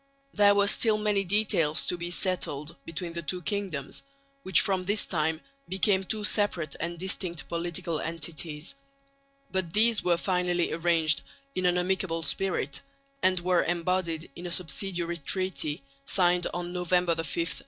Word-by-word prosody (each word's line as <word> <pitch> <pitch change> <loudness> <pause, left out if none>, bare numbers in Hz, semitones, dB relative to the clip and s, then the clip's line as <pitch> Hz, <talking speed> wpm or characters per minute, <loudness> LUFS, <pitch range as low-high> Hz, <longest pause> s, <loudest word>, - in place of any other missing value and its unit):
There 205 -1 +6
were 200 0 +4
still 215 +1 +3
many 210 -2 +1
details 180 -6 +2
to - - 0
be 175 0 -5
settled 170 -4 -1
between 165 +1 -5
the 170 - -4
two 180 +2 -3
kingdoms, 190 -8 -3 0.4
which 190 -8 +5
from 190 -3 +1
this 205 +3 +1
time 160 -2 0 0.3
became 190 +1 +3
two 215 +2 -2
separate 185 -8 +1
and 170 +1 -3
distinct 175 -3 -1
political 170 -1 -2
entities; 165 - -3 0.8
but 185 -3 -1
these 225 +1 +4
were 175 -1 +3
finally 180 -1 0
arranged 165 -3 +2 0.3
in 185 -1 +1
an 180 0 +3
amicable 180 -2 0
spirit, 175 -7 -2 0.4
and 185 -1 +3
were 180 0 +3
embodied 170 -2 -1
in 175 +1 -6
a - - -5
subsidiary 170 +1 -1
treaty 165 -3 -2 0.2
signed 180 +2 +3
November 180 0 0
5, - - -6
1842. 165 +2 -2
175 Hz, 145 wpm, -28 LUFS, 165-190 Hz, 0.8 s, There